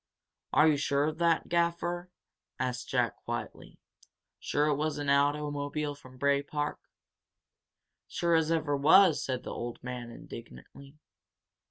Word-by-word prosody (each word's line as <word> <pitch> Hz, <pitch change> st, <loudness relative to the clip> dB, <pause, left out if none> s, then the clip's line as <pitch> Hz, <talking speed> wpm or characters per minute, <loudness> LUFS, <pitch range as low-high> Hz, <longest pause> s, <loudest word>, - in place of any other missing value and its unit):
"Are 150 Hz, -, +5 dB
you 150 Hz, -2 st, +4 dB
sure 140 Hz, 0 st, +1 dB
of 155 Hz, +2 st, -2 dB
that, 170 Hz, -1 st, +2 dB
Gaffer?" 175 Hz, +1 st, 0 dB, 0.5 s
asked 125 Hz, -1 st, -3 dB
Jack, -, -, 0 dB
quietly. -, -, -6 dB, 0.6 s
"Sure 145 Hz, -, 0 dB
that 150 Hz, -, +2 dB
it -, -, +2 dB
was 155 Hz, 0 st, -1 dB
an 145 Hz, -1 st, 0 dB
automobile 145 Hz, +1 st, 0 dB
from 130 Hz, -3 st, -15 dB
Bray 140 Hz, +1 st, +2 dB
Park?" 145 Hz, +1 st, -3 dB, 1.3 s
"Sure 170 Hz, -1 st, 0 dB
as 160 Hz, -1 st, +3 dB
ever 155 Hz, -3 st, +1 dB
was!" 160 Hz, +2 st, +6 dB
said 130 Hz, -2 st, -3 dB
the -, -, -6 dB
old 120 Hz, +1 st, -6 dB
man, 125 Hz, -1 st, -5 dB
indignantly. 135 Hz, +4 st, -12 dB
145 Hz, 140 wpm, -30 LUFS, 140-160 Hz, 1.3 s, was